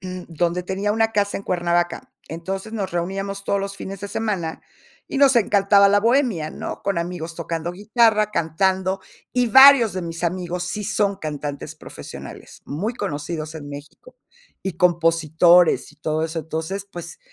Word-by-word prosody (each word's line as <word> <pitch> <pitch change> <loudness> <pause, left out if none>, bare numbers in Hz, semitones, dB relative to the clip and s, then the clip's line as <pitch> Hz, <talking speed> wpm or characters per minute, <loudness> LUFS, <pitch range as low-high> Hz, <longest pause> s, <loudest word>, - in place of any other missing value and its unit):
donde 180 -1 -3
tenía 195 +3 -1
una 225 +1 +1
casa 200 -1 0
en - - -6
Cuernavaca. 175 -1 -1 0.2
Entonces, 190 +6 -5
nos 200 -4 -3
reuníamos 195 +3 -3
todos 200 0 0
los 195 0 -5
fines 195 0 -7
de 205 - -5
semana 195 -8 -3 0.5
y 275 - -3
nos 275 -3 +5
encantaba 200 -2 +5
la 205 +1 +4
bohemia, 230 - +1
¿no? - - -6
Con 200 -4 0
amigos 170 -1 -5
tocando 170 0 -3
guitarra, 215 +2 +2
cantando, 190 +3 0 0.3
y 250 0 +2
varios 265 -3 +8
de 185 0 -4
mis 165 0 -5
amigos 180 0 -2
sí 210 +4 -4
son 205 -1 0
cantantes 145 -4 -6
profesionales - - -10
muy 195 +11 -3
conocidos 155 - -4
en 145 -2 -8
México, 145 - -11 0.5
y 190 - -2
compositores, 170 -1 +3
y - - -23
todo 155 +1 -1
eso. 165 0 -3
Entonces, 160 +6 -4
pues, 175 -3 -8
185 Hz, 155 wpm, -22 LUFS, 165-200 Hz, 0.5 s, varios